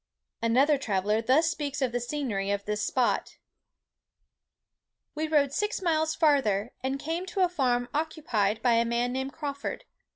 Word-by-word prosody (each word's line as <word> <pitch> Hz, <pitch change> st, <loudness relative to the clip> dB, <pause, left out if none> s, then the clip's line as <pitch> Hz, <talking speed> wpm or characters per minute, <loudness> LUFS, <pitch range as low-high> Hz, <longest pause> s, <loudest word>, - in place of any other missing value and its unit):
Another 265 Hz, +6 st, +3 dB
traveller 210 Hz, -2 st, 0 dB
thus 270 Hz, +8 st, +3 dB
speaks 295 Hz, -4 st, -4 dB
of 260 Hz, -3 st, 0 dB
the 245 Hz, -, -1 dB
scenery 240 Hz, -6 st, -2 dB
of 200 Hz, 0 st, -1 dB
this 210 Hz, 0 st, -2 dB
spot:—"We 295 Hz, +4 st, -6 dB
rode 290 Hz, -3 st, +2 dB
six 420 Hz, +6 st, -1 dB
miles 315 Hz, -3 st, +1 dB
farther, 255 Hz, -, +2 dB
and 265 Hz, +1 st, -2 dB
came 330 Hz, +5 st, -3 dB
to 380 Hz, +1 st, -2 dB
a -, -, +5 dB
farm 250 Hz, -8 st, 0 dB
occupied 270 Hz, -9 st, -1 dB
by 245 Hz, -2 st, +4 dB
a 230 Hz, 0 st, +4 dB
man 235 Hz, +1 st, 0 dB
named 265 Hz, +1 st, -3 dB
Crawford. 285 Hz, -, -5 dB
265 Hz, 150 wpm, -28 LUFS, 230-310 Hz, -, a